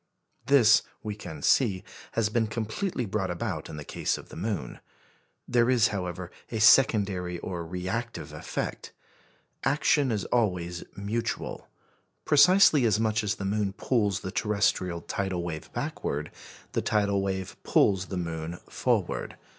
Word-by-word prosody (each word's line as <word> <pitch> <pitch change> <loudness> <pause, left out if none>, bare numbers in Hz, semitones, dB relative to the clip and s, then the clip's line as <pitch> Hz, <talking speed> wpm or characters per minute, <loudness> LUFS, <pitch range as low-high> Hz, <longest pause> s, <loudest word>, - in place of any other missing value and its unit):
This, 125 -6 +6 0.2
we 105 - -3
can 85 -8 -9
see, 100 -8 +3 0.3
has 115 -2 +1
been 110 0 +1
completely 115 - -2
brought 95 -2 -2
about 90 -1 -3
in 75 - -7
the 75 - -6
case - - -2
of - - -12
the - - -11
moon. 95 - -4 0.7
There 120 0 +3
is, 120 -2 +4
however, 90 -3 -4 0.2
a 110 - -3
secondary 100 -6 +4
or 85 0 -5
reactive 95 +8 -4
effect. - - -5 0.7
Action 140 0 +2
is 105 -3 -1
always 90 -7 0
mutual. 105 +4 -3 0.6
Precisely 160 -2 +6
as 110 -2 +3
much 110 0 +1
as 105 +1 0
the 100 - -5
moon 100 0 0
pulls 105 -4 0
the 95 - -5
terrestrial 95 -5 0
tidal 95 -1 -2
wave 80 -2 -6
backward, 75 +2 -3 0.4
the - - 0
tidal 100 -2 +1
wave 95 -1 -3
pulls 95 -2 +2
the 95 - -4
moon 85 -1 -4
forward. - - -1
100 Hz, 140 wpm, -28 LUFS, 90-115 Hz, 0.7 s, This